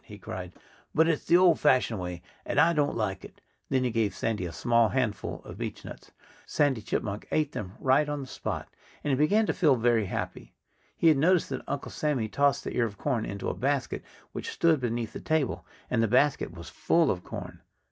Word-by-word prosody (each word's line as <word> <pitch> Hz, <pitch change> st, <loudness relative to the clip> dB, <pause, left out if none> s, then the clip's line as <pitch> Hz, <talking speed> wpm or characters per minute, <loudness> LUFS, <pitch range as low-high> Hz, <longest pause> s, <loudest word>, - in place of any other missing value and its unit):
he 105 Hz, -6 st, -11 dB
cried. 90 Hz, -2 st, -7 dB, 0.4 s
"But 160 Hz, +1 st, +5 dB
it's 165 Hz, -3 st, 0 dB
the 175 Hz, -, +6 dB
old 180 Hz, -3 st, +5 dB
fashioned 130 Hz, -6 st, +3 dB
way; 90 Hz, -1 st, -5 dB, 0.2 s
and -, -, 0 dB
I 165 Hz, +2 st, +5 dB
don't 145 Hz, -5 st, +1 dB
like 95 Hz, -4 st, -2 dB
it." -, -, -13 dB, 0.3 s
Then 130 Hz, -1 st, +2 dB
he 125 Hz, -, 0 dB
gave 110 Hz, -4 st, 0 dB
Sandy 105 Hz, -5 st, -2 dB
a -, -, -7 dB
small 115 Hz, +2 st, +2 dB
handful 125 Hz, -6 st, -2 dB
of -, -, -9 dB
beechnuts. -, -, -7 dB, 0.4 s
Sandy 140 Hz, -6 st, +1 dB
Chipmunk 105 Hz, 0 st, -3 dB
ate 155 Hz, -2 st, +1 dB
them 95 Hz, -7 st, -6 dB
right 140 Hz, +3 st, +3 dB
on 145 Hz, 0 st, -2 dB
the -, -, -6 dB
spot. -, -, -5 dB, 0.4 s
And 145 Hz, -, 0 dB
he -, -, +3 dB
began 200 Hz, +11 st, +3 dB
to -, -, 0 dB
feel 150 Hz, -7 st, +4 dB
very 115 Hz, -3 st, +2 dB
happy. -, -, -5 dB, 0.4 s
He 165 Hz, -, +5 dB
had 155 Hz, -, +4 dB
noticed 175 Hz, +4 st, +3 dB
that 130 Hz, -, -3 dB
Uncle 140 Hz, 0 st, -4 dB
Sammy 145 Hz, -7 st, -1 dB
tossed 140 Hz, +4 st, +2 dB
the -, -, -5 dB
ear 120 Hz, -, +3 dB
of 100 Hz, -2 st, -10 dB
corn 120 Hz, -4 st, -1 dB
into 100 Hz, -, -5 dB
a -, -, 0 dB
basket 140 Hz, +1 st, -1 dB, 0.3 s
which -, -, -5 dB
stood 165 Hz, -3 st, +2 dB
beneath 120 Hz, -2 st, -2 dB
the -, -, -6 dB
table. 155 Hz, -4 st, -1 dB, 0.2 s
And 120 Hz, -2 st, +1 dB
the 115 Hz, -, +3 dB
basket 130 Hz, +6 st, +2 dB
was 85 Hz, -1 st, -10 dB
full 165 Hz, -3 st, +2 dB
of 90 Hz, -1 st, -4 dB
corn. -, -, -8 dB
130 Hz, 210 wpm, -28 LUFS, 110-150 Hz, 0.4 s, the